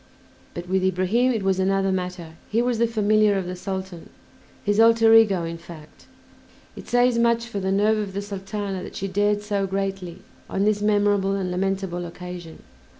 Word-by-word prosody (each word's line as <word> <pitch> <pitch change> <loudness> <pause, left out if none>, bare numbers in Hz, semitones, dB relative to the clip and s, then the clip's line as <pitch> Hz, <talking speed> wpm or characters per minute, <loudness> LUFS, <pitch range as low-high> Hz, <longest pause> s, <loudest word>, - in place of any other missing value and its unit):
But 175 +1 -6
with 190 +1 0
Ibrahim 190 +7 +2
it 220 -5 -2
was 190 -1 +1
another 195 0 +1
matter; 180 -2 -4 0.2
he 220 - +1
was 240 -1 0
the 235 - +3
familiar 215 -2 +2
of 190 - -2
the 180 +1 -5
Sultan, 190 -2 -6 0.5
his 205 +1 +1
alter 225 0 +6
ego 205 -6 +5
in 165 0 -5
fact. 160 -3 -14 0.7
It - - -11
says 245 -1 +3
much 235 0 +2
for 235 -4 -5
the 190 0 -1
nerve 210 +2 +2
of 200 -2 -4
the 200 - -3
Sultana 195 -1 -5
that - - -9
she 195 - -3
dared 205 +2 0
so 200 -2 -1
greatly 190 -2 -4 0.3
on 195 - -1
this 210 0 +1
memorable 205 -2 +2
and 185 -2 -2
lamentable 190 -1 -2
occasion. 175 -1 -9
195 Hz, 180 wpm, -23 LUFS, 185-210 Hz, 0.7 s, alter